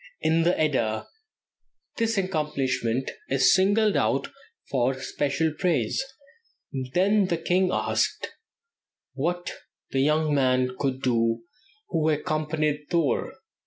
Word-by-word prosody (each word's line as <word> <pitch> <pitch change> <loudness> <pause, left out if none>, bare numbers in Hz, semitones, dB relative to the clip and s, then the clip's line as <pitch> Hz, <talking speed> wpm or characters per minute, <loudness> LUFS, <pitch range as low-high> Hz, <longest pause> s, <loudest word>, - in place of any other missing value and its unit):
In 160 +1 +2
the 175 +2 +2
"Edda" 115 -8 0 0.9
this 230 -1 0
accomplishment 135 -9 -1 0.2
is 135 +6 +4
singled 205 +2 +3
out 130 - +1 0.4
for 130 0 +1
special 145 +3 -1
praise: 155 - 0 0.9
"Then 200 +2 +3
the 170 - 0
king 185 +3 +1
asked - - 0 0.8
what 175 +6 -2 0.4
that 135 - 0
young 150 +2 +2
man 130 -2 +2
could 135 -1 -2
do 115 -2 +1 0.5
who 160 -1 +1
accompanied 150 -1 -1
Thor. 165 -5 +1
150 Hz, 105 wpm, -26 LUFS, 130-175 Hz, 0.9 s, is